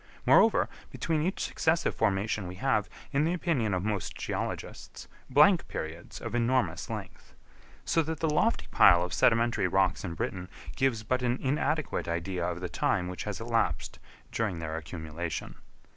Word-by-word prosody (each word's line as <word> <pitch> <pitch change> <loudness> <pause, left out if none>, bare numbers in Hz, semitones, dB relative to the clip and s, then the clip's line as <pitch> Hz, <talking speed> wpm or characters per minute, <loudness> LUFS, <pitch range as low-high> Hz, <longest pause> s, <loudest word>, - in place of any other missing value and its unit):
Moreover, - - +5 0.2
between 160 -2 -1
each 185 +5 -1
successive 165 +1 +1
formation 100 0 0
we 90 - -7
have, 110 -2 0 0.2
in 145 +1 +2
the 165 +2 +1
opinion 130 - 0
of 90 - -2
most 105 -3 -2
geologists, - - -5 0.2
blank 150 +7 +5
periods 80 +2 -6
of - - -6
enormous 120 +2 +1
length. - - -8 0.5
So 165 - +2
that 160 0 -4
the 160 - +1
lofty 160 +9 +1
pile 90 -2 +6
of 90 -1 -4
sedimentary 115 +2 +3
rocks 95 -1 +1
in 85 -4 -4
Britain 90 +2 -4 0.3
gives 130 -5 +1
but 130 +3 0
an 125 0 +1
inadequate 150 +2 -1
idea 85 +2 -2
of 90 0 -5
the 90 - -2
time 90 +1 0
which 90 - -5
has 105 -2 -4
elapsed 115 -9 -1 0.3
during 105 -6 -1
their 80 -1 -4
accumulation. 80 0 -5
110 Hz, 160 wpm, -29 LUFS, 90-135 Hz, 0.5 s, pile